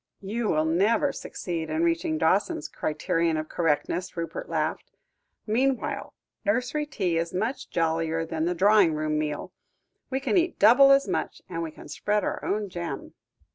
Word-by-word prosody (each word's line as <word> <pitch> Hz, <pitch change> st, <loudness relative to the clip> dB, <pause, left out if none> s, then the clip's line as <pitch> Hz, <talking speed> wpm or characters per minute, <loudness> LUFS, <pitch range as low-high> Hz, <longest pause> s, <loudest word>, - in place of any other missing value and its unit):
"You 220 Hz, +4 st, -2 dB
will 155 Hz, -3 st, +2 dB
never 210 Hz, -, +2 dB
succeed 165 Hz, -3 st, -5 dB
in 155 Hz, +1 st, 0 dB
reaching 165 Hz, -2 st, +1 dB
Dawson's 160 Hz, 0 st, +1 dB
criterion 165 Hz, +1 st, -1 dB
of 155 Hz, 0 st, -3 dB
correctness," 170 Hz, +3 st, -1 dB
Rupert 170 Hz, -, -4 dB
laughed; -, -, -2 dB, 0.6 s
"meanwhile, 255 Hz, +4 st, -1 dB, 0.3 s
nursery 250 Hz, +8 st, 0 dB
tea 180 Hz, -, 0 dB
is 170 Hz, +1 st, -3 dB
much 220 Hz, +8 st, -2 dB
jollier 165 Hz, 0 st, 0 dB
than 160 Hz, 0 st, -2 dB
the 180 Hz, +1 st, 0 dB
drawing 195 Hz, -3 st, +5 dB
room 155 Hz, 0 st, 0 dB
meal. 150 Hz, -1 st, -3 dB, 0.6 s
We 265 Hz, -, -1 dB
can 290 Hz, +8 st, +1 dB
eat 350 Hz, 0 st, +1 dB
double 255 Hz, +6 st, +7 dB
as 275 Hz, 0 st, +5 dB
much, -, -, -3 dB
and 170 Hz, -2 st, -4 dB
we 165 Hz, -, -3 dB
can 155 Hz, -, -13 dB
spread 205 Hz, +7 st, -1 dB
our -, -, -3 dB
own 210 Hz, 0 st, -1 dB
jam." 170 Hz, -6 st, -6 dB
175 Hz, 160 wpm, -26 LUFS, 160-220 Hz, 0.6 s, double